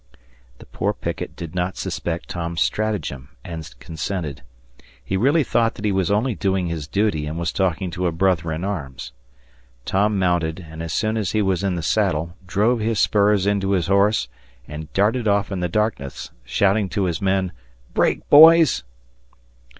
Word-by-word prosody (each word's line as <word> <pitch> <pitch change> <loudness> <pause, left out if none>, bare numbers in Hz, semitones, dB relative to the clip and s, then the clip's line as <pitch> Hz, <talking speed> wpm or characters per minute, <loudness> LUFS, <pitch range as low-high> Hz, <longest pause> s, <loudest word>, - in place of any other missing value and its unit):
The - - -14
poor - - -2
picket - - -5
did 80 -2 -7
not 90 0 -2
suspect 85 0 -4
Tom's 85 -1 -4
stratagem 100 -12 -1 0.2
and 80 -3 -7
consented. 80 -3 -5 0.6
He 95 - -2
really 140 - +3
thought 115 -2 +1
that 105 - -6
he 105 - +2
was 95 -1 0
only 110 +5 +1
doing 95 -3 0
his 80 -4 -4
duty 85 -5 0
and 80 +2 -4
was 85 0 -1
talking 95 -1 -1
to 90 +1 -1
a - - 0
brother 85 -1 +1
in 80 +2 -3
arms. 70 -10 -5 0.7
Tom 105 +2 +1
mounted 90 -2 0
and, 80 +1 -9
as 85 -1 -4
soon 110 +7 0
as 105 -4 -2
he 110 -1 +2
was 95 -1 0
in 95 -2 0
the 85 - -4
saddle, 80 +3 0
drove 110 +7 +2
his 110 0 0
spurs 100 -2 +3
into 100 -1 +1
his 90 -4 +1
horse, 100 - +2 0.4
and 75 +1 -8
darted 110 +4 +1
off 100 0 +1
in 95 - -2
the 90 0 -1
darkness, 105 -9 -2
shouting 100 0 +1
to 100 - -1
his 85 -4 -1
men, 95 -1 +1 0.4
"Break, - - +1
boys!" 160 - +7
95 Hz, 175 wpm, -22 LUFS, 85-105 Hz, 0.7 s, boys